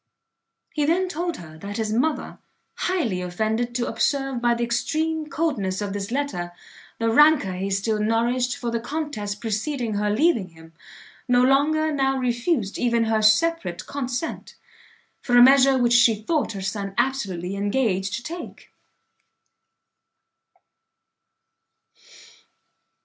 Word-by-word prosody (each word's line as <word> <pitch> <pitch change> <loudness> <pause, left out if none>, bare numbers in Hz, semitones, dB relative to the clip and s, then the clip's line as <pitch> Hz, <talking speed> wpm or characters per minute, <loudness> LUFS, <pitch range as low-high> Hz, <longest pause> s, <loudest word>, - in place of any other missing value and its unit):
He 300 - 0
then 365 +4 +2
told 345 0 -3
her, 160 -2 -12
that 200 +3 -6
his 220 -1 -1
mother, 290 +7 -1 0.3
highly 290 - -1
offended 220 +7 -2
to 240 -1 0
observe 270 +1 -1
by 240 0 +3
the 235 - -2
extreme 310 +6 -1
coldness 275 - -1
of 205 -1 -3
this 200 -1 -4
letter, 235 -10 -3 0.4
the 230 0 0
rancour 295 -7 +5
he 190 +2 -3
still 205 +3 0
nourished 235 +3 0
for 235 - -3
the 235 - -1
contest 230 -7 -4
preceding 230 +2 -2
her 210 0 0
leaving 230 - +2
him, 165 0 -17 0.5
no 245 0 +4
longer 305 +4 +3
now 270 -2 +1
refused 240 - -1
even 235 -1 +2
her 220 -1 +1
separate 215 - +2
consent, 270 +2 -4 0.7
for 245 -2 +2
a 245 - +9
measure 270 +1 +6
which 240 -1 +2
she 235 -1 +5
thought 225 +4 -1
her 195 -1 -6
son 195 0 -4
absolutely 195 -9 -1
engaged 200 -2 0
to 235 - -6
take. 335 +3 -8
235 Hz, 130 wpm, -23 LUFS, 205-280 Hz, 0.7 s, a